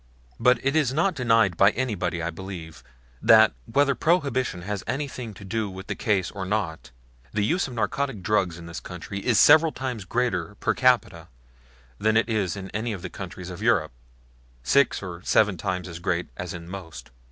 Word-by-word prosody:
But 125 0 +5
it 135 +2 +2
is 150 -6 +3
not 170 +7 +1
denied 115 - +3
by 100 - +6
anybody, 105 -9 -2
I 85 - -2
believe, 80 -6 -9 0.4
that, 110 -1 +6 0.2
whether 140 +2 +3
Prohibition 135 - 0
has 100 0 -4
anything 130 -4 -4
to 100 - -11
do 110 +1 -2
with 95 0 -9
the - - -3
case 95 -4 0
or 100 -2 -5
not, 95 -7 -2 0.4
the 105 -1 +1
use 180 - +1
of 125 - -9
narcotic 120 -2 -2
drugs 95 -4 +1
in 85 - -10
this 85 0 -6
country 90 +2 -7
is 120 -4 +2
several 160 +2 +7
times 125 -8 -5
greater 105 -4 -1
per - - 0
capita 120 -10 +2 0.7
than 110 +1 +2
it 115 - +2
is 105 -7 -1
in 95 -1 -7
any 110 +1 -2
of 95 -3 -7
the 90 - -6
countries 90 0 -7
of 90 +2 -8
Europe 110 -9 +2 0.7
six 135 - +3
or 90 -2 -7
seven 105 -2 +3
times 90 +1 -3
as 85 -1 -8
great 85 0 -1
as 90 0 -5
in 85 0 -9
most. 90 -7 -9
100 Hz, 185 wpm, -25 LUFS, 90-125 Hz, 0.7 s, several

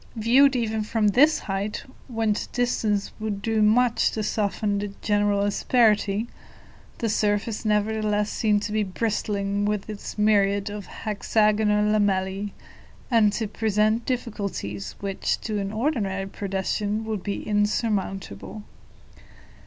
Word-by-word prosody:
Viewed 255 +5 +4
even 220 -2 0
from 215 0 +1
this 300 +9 +5
height, 200 +2 -3 0.2
whence 225 -4 -1
distance 220 -4 0
would 215 -2 -3
do 220 +1 0
much 230 +3 +4
to 215 - -2
soften 205 -1 -1
the 205 - -2 0.2
general 205 -1 +2
asperity, 210 0 +2 0.7
the 230 - -1
surface 210 +1 0
nevertheless 210 0 +1
seemed 210 -2 +1
to 210 - -3
be 215 0 +1
bristling 200 0 -1
with 210 -1 -1
its 210 -1 -7
myriads 205 -1 +2
of 205 -2 -7
hexagonal 210 0 +1
lamellae, 200 -1 +1 0.6
and 220 -3 +5
to 220 -1 -2
present 215 +2 +1
difficulties 200 - -4
which, 195 -1 -1
to 215 -2 -2
an 195 0 -3
ordinary 215 -6 -1
pedestrian, 200 +2 -2
would 215 -3 -3
be 200 +2 -4
insurmountable. 205 - -1
210 Hz, 120 wpm, -25 LUFS, 200-220 Hz, 0.7 s, this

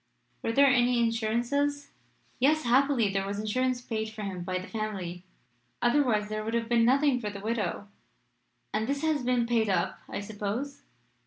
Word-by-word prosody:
Were - - -1
there 280 +5 +5
any 250 -2 +4
insurances?" 240 +6 0 0.5
"Yes; 305 +4 +3
happily 250 -3 +3
there 195 0 -1
was 200 0 -3
insurance 250 +4 0
paid 220 -2 -3
for 220 -1 -7
him 185 -3 -4
by 185 0 -2
the 185 - -5
family. 195 -5 -4 0.6
Otherwise 240 -5 +2
there 215 0 -3
would 225 +2 -2
have 230 -1 0
been 235 -1 +3
nothing 270 +1 +3
for 210 - -3
the 200 -1 -7
widow." 215 -1 -2 0.9
"And 220 +1 0
this 280 +2 -2
has 310 -3 +1
been 245 -1 +1
paid 230 -2 +1
up, 180 -3 0
I - - -4
suppose?" 215 +7 -4
230 Hz, 170 wpm, -28 LUFS, 210-255 Hz, 0.9 s, there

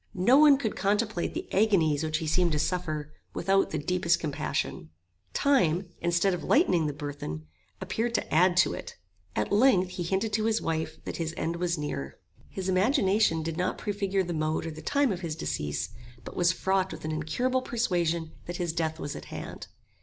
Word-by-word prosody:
No 195 +8 +4
one 295 -2 +8
could 225 -6 -2
contemplate 205 -2 0
the - - -4
agonies 170 -8 +3
which 155 0 0
he 160 - -4
seemed 170 +1 +2
to - - +1
suffer 155 -3 -2 0.2
without 195 0 +2
the 155 - -2
deepest 170 +2 +1
compassion. 145 - -3 0.5
Time, 185 - +2
instead 175 +3 +2
of 175 -4 -4
lightening 180 - +3
the - - -1
burthen, 145 - -6 0.3
appeared 235 +1 -2
to - - -2
add 175 +3 +4
to 180 - +4
it. - - -7 0.4
At 105 - -1
length 205 -5 +4
he 180 - -6
hinted 195 +5 -1
to 215 0 +1
his 225 0 +2
wife, 160 -1 -2
that - - -4
his 165 -1 -3
end 165 +1 -2
was 175 -1 0
near. 70 - -4 0.3
His 190 -1 -5
imagination 195 - +3
did 165 0 -3
not 180 0 -1
prefigure 200 -2 -1
the 175 -1 -4
mode 155 0 -1
or 165 - -3
the 155 0 -9
time 280 - +2
of 180 - -2
his 165 -3 -3
decease, 75 - -3 0.3
but - - -9
was 175 0 +3
fraught 190 +1 0
with - - -8
an 155 - -2
incurable 245 - 0
persuasion 175 -10 0 0.2
that 175 0 -4
his 175 -3 -1
death 160 -1 -1
was 145 - -4
at - - -8
hand. - - -7
175 Hz, 190 wpm, -28 LUFS, 155-195 Hz, 0.5 s, one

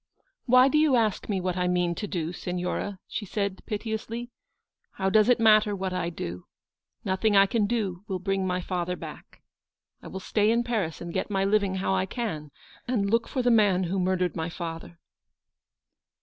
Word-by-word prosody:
"Why 255 +1 +7
do 300 +2 +3
you 305 -4 +4
ask 220 -4 0
me 195 -2 0
what 180 -1 -2
I 180 -1 0
mean 180 -1 +1
to 210 +4 -4
do, 170 -3 -3
Signora? 180 +3 -3
" - - -64
she - - -4
said 200 -1 -3
piteously. 225 +2 -4 0.3
" - - -52
How 190 0 -1
does 215 +2 +5
it 245 - +4
matter 215 -2 +5
what 190 -1 -3
I 170 -2 -1
do? 90 - -6 0.6
Nothing 205 +3 +1
I 195 - +8
can 210 +1 +1
do 200 -5 -2
will 190 - -2
bring 195 0 -1
my 180 0 -1
father 180 0 -2
back. - - -11 0.6
I - - -10
will 190 - -6
stay 210 +2 +1
in 235 +1 +2
Paris, 215 -10 -2
and 170 -1 -6
get - - -2
my 195 -1 +1
living 200 -1 +2
how 190 0 0
I 190 0 +1
can, 195 -10 -4 0.4
and 205 -5 0
look 230 0 +2
for 255 - -2
the 245 - +4
man 205 -5 +4
who 185 +2 -1
mur 185 +1 +1
dered 180 -3 -1
my 160 +1 -2
father." 170 0 -7
195 Hz, 200 wpm, -27 LUFS, 180-220 Hz, 0.6 s, I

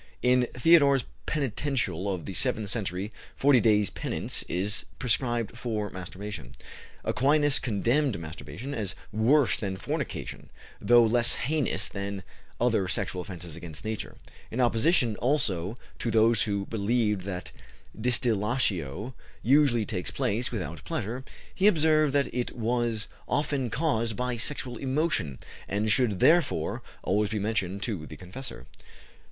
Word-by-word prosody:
In 125 0 +4
Theodore's 140 -1 +5 0.2
Penitential 120 - -1
of 90 -5 -4
the 95 - -5
seventh 115 -3 0
century, 100 -1 -2 0.2
forty 140 -2 +5
days' 105 -3 +3
penance - - -2
is 100 +5 -1
prescribed 120 -2 0
for 110 -4 -3
masturbation. 95 -6 -7 0.5
Aquinas 145 +2 +3
condemned 120 - +1
masturbation 85 - -7
as 100 -6 -2 0.2
worse 120 +6 +3
than 95 -3 -3
fornication, - - -4 0.3
though 120 0 +6
less 120 +1 +3
heinous 150 0 0
than 100 -1 -5 0.4
other 115 -6 +2
sexual 90 0 -1
offences 90 -3 -7
against 85 -2 -8
Nature; 110 -1 -4 0.3
in 115 - -4
opposition, 120 -1 +3
also, 115 - +1 0.2
to 120 - -1
those 115 0 +4
who 100 -2 -1
believed 105 -1 0
that 90 -2 -5 0.4
distillatio 110 - 0 0.3
usually 130 -4 +4
takes 90 -2 -3
place 115 +5 0
without 85 - -5
pleasure, 120 - -3 0.3
he 195 - +3
observed 155 -5 +4
that 140 -1 +1
it 125 0 -3
was 115 -1 0 0.2
often 140 -4 0
caused 115 -5 0
by 125 +1 -1
sexual 125 0 -3
emotion, 135 - 0 0.3
and 105 +2 0
should, 110 -6 +2
therefore, 170 - +3 0.2
always 105 +2 +1
be 110 - -2
mentioned 100 -2 -1
to 95 -10 -3
the - - -10
confessor. 95 +9 -8
115 Hz, 130 wpm, -28 LUFS, 100-130 Hz, 0.5 s, though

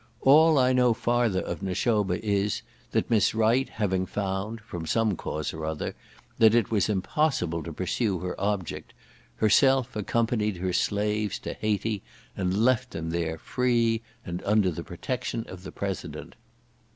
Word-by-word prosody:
All 155 +3 +6
I 130 -1 +4
know 125 -2 +4
farther 120 -5 +1
of - - -5
Nashoba 100 0 0
is, 100 0 0 0.3
that - - -1
Miss 110 -1 +3
Wright 115 +4 +3
having 95 -3 -1
found 100 +3 -3
(from 85 -7 -7
some 110 -1 +2
cause 75 -2 -4
or 80 0 -6
other) 80 -1 -3 0.5
that 110 0 +6
it 115 -3 +2
was 105 -2 +2
impossible 95 - 0
to 85 - -6
pursue 95 +4 -1
her 90 0 -3
object, 100 -4 -3 0.4
herself 130 - +3
accompanied 110 -1 0
her 90 0 -2
slaves 105 +1 0
to - - -4
Hayti, 105 -1 -1 0.3
and 95 +4 +1
left 125 0 +2
them 80 0 -4
there, 85 -1 -2
free, 115 +2 +1 0.2
and 85 +1 -4
under 105 -2 +3
the 85 +1 -5
protection 115 +6 -4
of 90 -1 -9
the 95 - -8
President. 100 -2 -5
105 Hz, 150 wpm, -27 LUFS, 95-115 Hz, 0.5 s, All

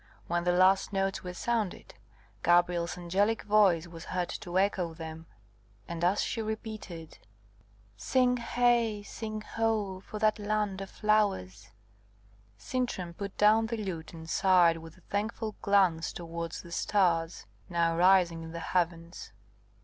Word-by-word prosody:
When 175 0 -1
the 180 - +3
last 185 +3 +4
notes 195 0 -1
were 180 0 -6
sounded, 225 -2 -2 0.5
Gabrielle's 175 0 +2
angelic 195 +6 0
voice 200 -6 +4
was 170 -1 -10
heard 180 -1 -2
to 175 +1 -4
echo 185 -4 +1
them; 160 0 -8 0.6
and 170 0 -5
as 185 +4 +2
she 225 - -2
repeated, 215 -7 -6 0.8
"Sing 250 - +2
heigh, 235 -3 +1
sing 215 +1 -6
ho, 215 -4 -1
for 215 - -8
that 215 0 +2
land 205 -2 -1
of 195 - -6
flowers," 205 - 0 0.9
Sintram 180 - -3
put 200 +2 -7
down 220 +2 +5
the 230 0 -3
lute, 180 -7 -5
and 160 -1 -10
sighed 180 -2 +4
with 165 +1 -12
a - - -20
thankful 215 +2 -3
glance 190 -5 +2
towards 170 -1 -6
the 170 - -12
stars, 170 -4 +1 0.2
now 170 -1 +1
rising 175 -2 +4
in 160 0 -8
the 170 - -5
heavens. 170 -1 -2
185 Hz, 140 wpm, -30 LUFS, 170-215 Hz, 0.9 s, down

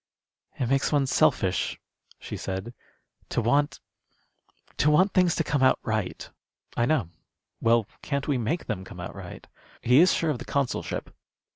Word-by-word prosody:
"It 125 - -1
makes 135 +2 +1
one 145 -2 +3
selfish," 130 - +1 0.4
she - - -7
said, 95 +5 -5 0.6
"to - - 0
want 140 +6 +1 1.0
to 150 - +3
want 185 +6 +4
things 180 -2 +3
to 165 - +1
come 145 -2 0
out 130 - +5
right." 110 -5 -2 0.5
"I 120 - +2
know. 135 - +1 0.5
Well, 115 -1 +3 0.2
can't 140 -1 -2
we 140 -4 +1
make 150 +10 -1
them 100 -5 -3
come - - -11
out - - -6
right? - - -9 0.4
He 125 +3 +5
is 180 +2 +6
sure 165 -2 +1
of 130 - -3
the - - -7
consulship?" 140 -2 -2
135 Hz, 160 wpm, -26 LUFS, 115-150 Hz, 1.0 s, is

